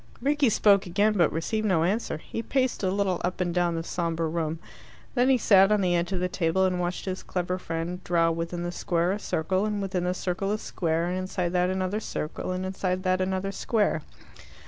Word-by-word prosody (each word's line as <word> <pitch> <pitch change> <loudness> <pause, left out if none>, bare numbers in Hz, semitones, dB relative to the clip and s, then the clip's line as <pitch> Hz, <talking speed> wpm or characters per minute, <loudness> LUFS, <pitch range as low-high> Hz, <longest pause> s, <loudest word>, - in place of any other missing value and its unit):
Rickie 285 0 +2
spoke 200 -2 +4
again, 205 +4 +2
but 175 -6 +3
received 215 +7 -1
no 175 -5 +3
answer. 200 +1 0
He 225 - -6
paced 260 +1 0
a 190 - +1
little 190 -2 0
up 180 +1 -2
and 175 -2 0
down 175 -1 +1
the 165 - -2
sombre 165 -1 -1
roam. 160 0 -2 0.6
Then 250 0 +3
he 265 - +5
sat 195 -3 +5
on 210 -1 +3
the 180 -2 +2
edge 170 +2 0
of 190 - -1
the 180 - 0
table 180 +1 +1
and 180 -1 0
watched 175 0 -2
his 185 -1 -3
clever 180 0 -2
friend 170 +2 -4
draw 165 -1 +2
within 170 +1 -3
the 175 - -2
square 175 0 0
a 205 - -2
circle, 185 +1 0
and 210 -1 -1
within 190 -2 -2
the 180 0 0
circle 185 +2 -2
a 210 - +1
square, 165 -5 -1
and 180 +1 -1
inside 185 -1 -2
that 180 0 +2
another 190 +2 -1
circle, 155 -6 -4
and 185 0 -2
inside 185 -1 -2
that 185 0 +1
another 190 +1 -1
square. 205 -5 0
185 Hz, 215 wpm, -27 LUFS, 175-200 Hz, 0.6 s, he